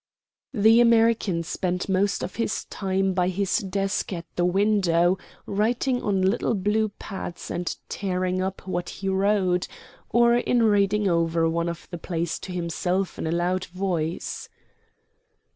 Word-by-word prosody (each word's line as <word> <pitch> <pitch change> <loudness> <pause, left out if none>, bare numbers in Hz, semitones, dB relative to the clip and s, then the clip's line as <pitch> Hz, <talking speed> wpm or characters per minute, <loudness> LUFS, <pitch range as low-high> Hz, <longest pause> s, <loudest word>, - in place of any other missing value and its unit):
The 220 +2 +6
American 225 -6 +3
spent 180 +2 -2
most 195 +1 +1
of - - -6
his 230 -2 -1
time 195 -1 -1
by 180 -1 +1
his 195 +1 0
desk 195 +1 -2
at 170 -2 -4
the 175 - +1
window 185 -2 +2 0.3
writing 240 +5 0
on 195 -2 0
little 200 +4 +1
blue 210 +3 +1
pads 195 -3 -7
and 175 0 -2
tearing 185 -1 -1
up 190 +1 -4
what 175 -1 -2
he 195 0 -4
wrote, 190 -2 +1 0.4
or 235 0 +4
in 245 -1 +2
reading 205 -1 +3
over 165 -1 +2
one 170 +1 0
of 170 -1 -7
the 175 - -5
plays 170 -1 -3
to 185 - -8
himself 180 +2 -2
in - - -2
a - - -1
loud 180 +2 0
voice. 175 -3 -3
190 Hz, 145 wpm, -25 LUFS, 175-205 Hz, 0.4 s, The